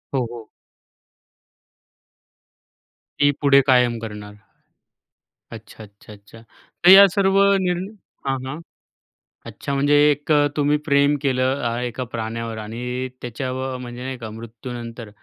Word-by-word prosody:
हो, 130 -2 +1
हो. 115 -2 -10 2.7
ती 145 0 +4
पुढे 140 -1 +5
कायम 125 -2 +3
करणार. 105 -2 -8 1.2
अच्छा, 110 0 -11
अच्छा, 100 +1 -16
अच्छा. 105 +2 -16 0.4
तर - - +6
या 195 +1 +10
सर्व 195 -1 +2 0.2
निर्ण 180 0 -1 0.4
हां, 135 0 0
हां. 140 +5 -6 0.9
अच्छा. 140 - -6
म्हणजे 145 +1 +2 0.2
एक 145 +2 -3 0.3
तुम्ही 145 0 +2
प्रेम 140 0 +3
केलं 130 0 0
अ, 120 0 -1
एका 125 +1 -4
प्राण्यावर 115 0 -4
आणि 125 +4 -5
त्याच्यावर 130 +2 -4
म्हणजे 125 0 -8
नाही 130 0 -5
का, 115 -2 -8
मृत्यूनंतर 115 +1 -9
125 Hz, 120 wpm, -21 LUFS, 115-140 Hz, 2.7 s, या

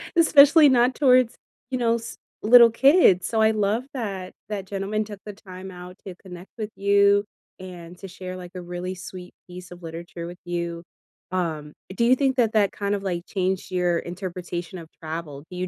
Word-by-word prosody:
especially 305 -1 +7
not 250 0 +3
towards, 255 -4 +4 0.4
you 255 - 0
know, 230 -2 +2
s 230 0 -7 0.3
little 235 +2 +8
kids, 235 - +4
so 220 -1 0
I 220 0 +5
love 215 +3 0
that 195 -8 -5 0.2
that 200 -3 -4
gentleman 200 +2 -2
took 205 -2 -10
the 210 - -7
time 190 -1 -11
out 180 +1 -11
to 190 -2 -8
connect 180 0 -12
with 215 -2 -4
you, 200 0 +3 0.3
and 180 -2 -10
to 195 - -9
share, 185 0 -8
like, 180 -1 -10
a 180 - -5
really 180 +1 -5
sweet 180 0 -10
piece 180 0 -11
of 175 0 -11
literature 170 +1 -7
with 175 - -9
you. 170 -1 -4 0.5
Um, 160 -5 -3 0.2
do 235 - +1
you 250 +2 +5
think 270 0 0
that 230 -2 +2
that 205 -3 +3
kind 200 0 -2
of 200 - -6
like 175 -2 -3
changed 190 -1 -2
your 180 -2 +1
interpretation 180 0 -6
of 165 - -11
travel? 155 -3 -6
Do 180 - -7
you 185 +1 -2
190 Hz, 190 wpm, -24 LUFS, 180-220 Hz, 0.5 s, little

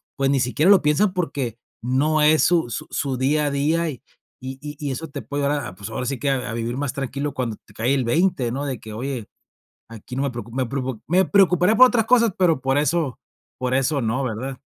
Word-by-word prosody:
pues 135 -1 +1
ni 140 - +2
siquiera 145 +9 +3
lo 195 - +6
piensan 155 +7 +2
porque 140 - -3 0.2
no 145 +6 +1
es 155 +1 +5
su 165 -8 +2
su 115 - -5
su 135 -3 -2
día 145 +3 +1
a - - -1
día, 160 +4 +1
y 130 -6 -8 0.4
y 130 +1 -7 0.2
y 145 -2 -3
eso 160 +5 -5
te - - -6
puede 145 0 -3
ayudar 145 0 0
a 90 - -9
pues 100 +3 -8
ahora 125 +3 -4
sí 130 -1 -3
que 140 - 0
a 130 -3 -1
a - - -4
vivir 115 +2 -3
más 140 -2 -2
tranquilo 140 +1 -3
cuando 120 -5 -3
te 105 - -20
cae 120 +6 0
el 135 -2 +1
20, 135 -3 +1
¿no? 140 +4 -3
De 130 -5 -3
que 110 -1 -10
oye, 125 -1 -4 0.6
aquí 115 +2 -9
no 135 - 0
me 140 - 0
preocupo 120 0 -8
me 130 -2 0
preocu 130 -3 -4
me 185 +3 +4
preocuparé 190 +1 +4
por 255 +3 +9
otras 230 -3 +1
cosas, 235 -4 +4
pero 170 -7 +3
por 135 +2 +1
eso 150 -2 0 0.4
por 130 0 -1
eso 135 +2 +1
no, 115 +4 0
¿verdad? 130 +3 -4
135 Hz, 235 wpm, -22 LUFS, 125-155 Hz, 0.6 s, por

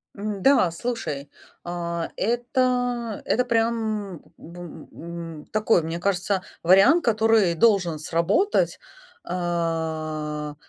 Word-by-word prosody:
М, 205 -1 -4
да, 270 -10 +5
слушай. 165 - -4 0.3
А, 170 -1 -3
это, 245 -1 0
это 250 +3 +1
прям, 225 -3 0
м, 165 - -10 0.2
б 170 +2 -12 0.4
м, 165 -2 -8
такой, 215 -4 +3
мне 165 +2 -4
кажется, 190 0 0 0.2
вариант, 195 - +5
который 220 -5 +3
должен 180 -5 +3
сработать. 170 - +1 0.4
А, 160 -3 -3
185 Hz, 100 wpm, -24 LUFS, 165-225 Hz, 0.4 s, да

